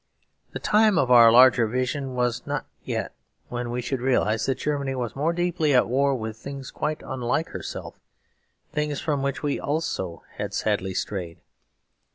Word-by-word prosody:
The -, -, -4 dB
time 215 Hz, -2 st, +4 dB
of 130 Hz, -5 st, +2 dB
our 115 Hz, -2 st, +9 dB
larger 125 Hz, -1 st, +6 dB
vision 130 Hz, +3 st, -2 dB
was 125 Hz, 0 st, -1 dB
not 145 Hz, -1 st, -2 dB, 0.2 s
yet, -, -, -3 dB, 0.4 s
when 120 Hz, 0 st, -3 dB
we 120 Hz, +1 st, -3 dB
should 130 Hz, 0 st, -2 dB
realise 115 Hz, -4 st, +1 dB
that 135 Hz, -1 st, 0 dB
Germany 140 Hz, -2 st, -2 dB
was 120 Hz, -3 st, -3 dB
more 150 Hz, +4 st, +1 dB
deeply 170 Hz, -4 st, +1 dB
at 125 Hz, -, +4 dB
war 140 Hz, +3 st, +2 dB
with 110 Hz, -2 st, -5 dB
things 135 Hz, +2 st, -8 dB
quite 155 Hz, 0 st, -3 dB
unlike 130 Hz, +4 st, -1 dB
herself, -, -, -7 dB, 0.7 s
things 150 Hz, -1 st, -1 dB
from 145 Hz, -3 st, -1 dB
which 140 Hz, +1 st, -2 dB
we 145 Hz, -1 st, 0 dB
also 115 Hz, -, -3 dB
had -, -, -4 dB
sadly 95 Hz, 0 st, -1 dB
strayed. 90 Hz, -5 st, -3 dB
130 Hz, 165 wpm, -25 LUFS, 120-145 Hz, 0.7 s, our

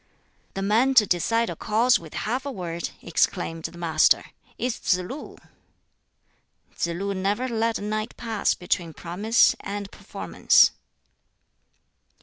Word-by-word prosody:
"The 195 Hz, -, -2 dB
man 230 Hz, +7 st, +3 dB
to 220 Hz, -4 st, +7 dB
decide 230 Hz, +6 st, +1 dB
a -, -, -6 dB
cause 230 Hz, +3 st, +2 dB
with 160 Hz, -2 st, -12 dB
half 250 Hz, +5 st, -2 dB
a 280 Hz, -, -4 dB
word," 170 Hz, -6 st, -4 dB
exclaimed 165 Hz, -1 st, -1 dB
the 175 Hz, -, -6 dB
Master, 160 Hz, -2 st, +3 dB, 0.3 s
"is 250 Hz, -1 st, -2 dB
Tsz 180 Hz, -, +2 dB
lu!" 185 Hz, +12 st, -7 dB, 1.4 s
Tsz -, -, -1 dB
lu 195 Hz, +4 st, -3 dB
never 200 Hz, +6 st, -1 dB
let 230 Hz, -1 st, 0 dB
a -, -, -7 dB
night 215 Hz, +2 st, -3 dB
pass 225 Hz, -3 st, 0 dB
between 175 Hz, -2 st, -2 dB
promise 205 Hz, +8 st, +2 dB
and 200 Hz, -1 st, -6 dB
performance. -, -, +3 dB
205 Hz, 135 wpm, -25 LUFS, 175-230 Hz, 1.4 s, to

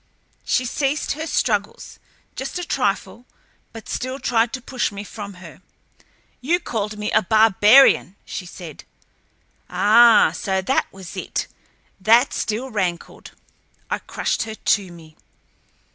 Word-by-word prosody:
She 255 Hz, -, 0 dB
ceased 275 Hz, +3 st, -1 dB
her 315 Hz, +3 st, -4 dB
struggles, 210 Hz, -8 st, -2 dB, 0.4 s
just 270 Hz, +6 st, -5 dB
a 355 Hz, -, -4 dB
trifle, 240 Hz, -2 st, -2 dB, 0.4 s
but 225 Hz, -1 st, -11 dB
still 255 Hz, +1 st, -4 dB
tried 235 Hz, -3 st, +1 dB
to 260 Hz, -, -3 dB
push 255 Hz, -2 st, -2 dB
me 200 Hz, 0 st, -7 dB
from 205 Hz, -1 st, -9 dB
her. 175 Hz, -1 st, -13 dB, 0.8 s
"You 330 Hz, +8 st, +1 dB
called 215 Hz, -, -4 dB
me 210 Hz, 0 st, -3 dB
a -, -, +4 dB
barbarian!" 215 Hz, +1 st, +5 dB
she 180 Hz, -, -7 dB
said. 170 Hz, -4 st, -10 dB, 0.9 s
Ah, 215 Hz, +5 st, +5 dB
so 190 Hz, -2 st, -2 dB
that 260 Hz, +8 st, 0 dB
was 190 Hz, -2 st, -11 dB
it! -, -, -3 dB, 0.5 s
That 230 Hz, +7 st, +4 dB
still 240 Hz, +5 st, -3 dB
rankled. 185 Hz, -5 st, -4 dB, 0.6 s
I -, -, -1 dB
crushed -, -, -3 dB
her 220 Hz, -1 st, -4 dB
to 195 Hz, -4 st, 0 dB
me. 160 Hz, -2 st, -15 dB
215 Hz, 130 wpm, -21 LUFS, 195-255 Hz, 0.9 s, barbarian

